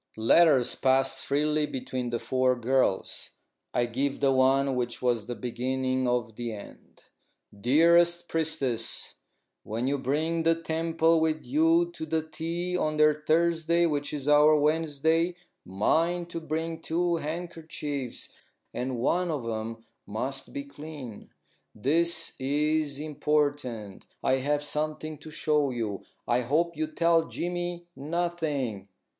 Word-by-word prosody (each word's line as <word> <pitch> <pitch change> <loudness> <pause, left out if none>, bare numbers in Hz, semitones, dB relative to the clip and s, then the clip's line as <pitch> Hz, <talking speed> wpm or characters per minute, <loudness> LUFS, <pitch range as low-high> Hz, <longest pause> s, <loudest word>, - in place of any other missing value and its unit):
Letters 125 +2 +5
passed 135 0 +2
freely 150 +1 +1
between 130 -2 -4
the 120 - -1
four 130 +1 +1
girls. 125 -4 0 0.4
I 120 - +1
give 135 +4 -2
the 140 -1 +3
one 135 +1 +3
which 120 -1 -2
was 120 -4 0
the 120 - -4
beginning 130 +1 -1
of 120 -3 -1
the 120 -2 -3
end: 105 - -12 0.5
"DEAREST 170 +9 +4
PRIESTESS, 145 -8 -1 0.5
When 115 +3 -3
you 140 +1 0
bring 155 +6 0
the 165 0 +3
temple 165 0 +1
with 160 -1 0
you 165 +6 +3
to 160 -2 -7 0.2
tea 165 +3 -3
on 155 -3 0
their 150 0 +6
Thursday 165 +2 +2
wich 145 -3 -1
is 145 -2 -4
our 150 +1 +6
Wensday, 160 +3 +1 0.3
mind 165 - 0
to 165 - -3
bring 160 +1 -3
two 170 +1 0
handkercheeves, 155 -4 -5 0.4
and 125 0 -3
one 175 +9 +1
of 150 -6 -2
them 115 0 -4 0.2
must 135 +6 -3
be 285 0 -4
clean. 150 - -9 0.5
This 165 +7 +1
is 145 +1 0
important. 145 -8 -1 0.2
I 130 - +3
have 145 +2 0
something 155 0 -3
to - - -10
show 150 -2 +1
you. 115 -5 -3 0.3
I 120 +1 +3
hope 160 +8 +1
you 315 - -1
tell 170 - +2
Jimy 175 0 -3
nothing. 150 - -2
150 Hz, 130 wpm, -28 LUFS, 130-165 Hz, 0.5 s, their